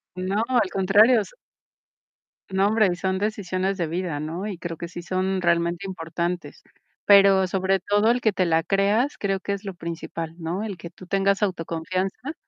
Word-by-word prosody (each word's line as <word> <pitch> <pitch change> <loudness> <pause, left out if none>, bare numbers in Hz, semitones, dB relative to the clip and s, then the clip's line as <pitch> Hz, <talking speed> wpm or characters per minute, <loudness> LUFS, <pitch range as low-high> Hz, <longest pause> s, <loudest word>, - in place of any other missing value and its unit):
No, 190 +4 -1
al 245 -7 +2
contrario, 210 +5 +5
s. - - -9 1.2
No, 195 +1 +2
hombre, 215 -3 +3
son 190 +1 -1
decisiones 195 -2 -2
de 170 -3 -1
vida, 170 -2 -3
¿no? 165 +6 -4
Y 200 -4 -5
creo 170 -1 -6
que 170 - -6
sí 175 - -7
son 185 +2 -1
realmente 170 +2 +1
importantes, 170 -1 -4 0.4
pero 195 -2 +6
sobre 190 +1 +1
todo 205 +4 +2
el 245 - +1
que 220 -3 +2
te 185 -1 +1
la 165 -1 +2
creas, 205 - +1
creo 195 -1 -1
que 200 - -3
es 200 0 -5
lo 195 -2 -5
principal, 165 -1 -6
¿no? 175 +4 -3
El 205 -4 -5
que 170 - -9
tú 180 +1 -15
tengas 195 +1 +1
autoconfianza 185 - -2
190 Hz, 180 wpm, -24 LUFS, 175-200 Hz, 1.2 s, pero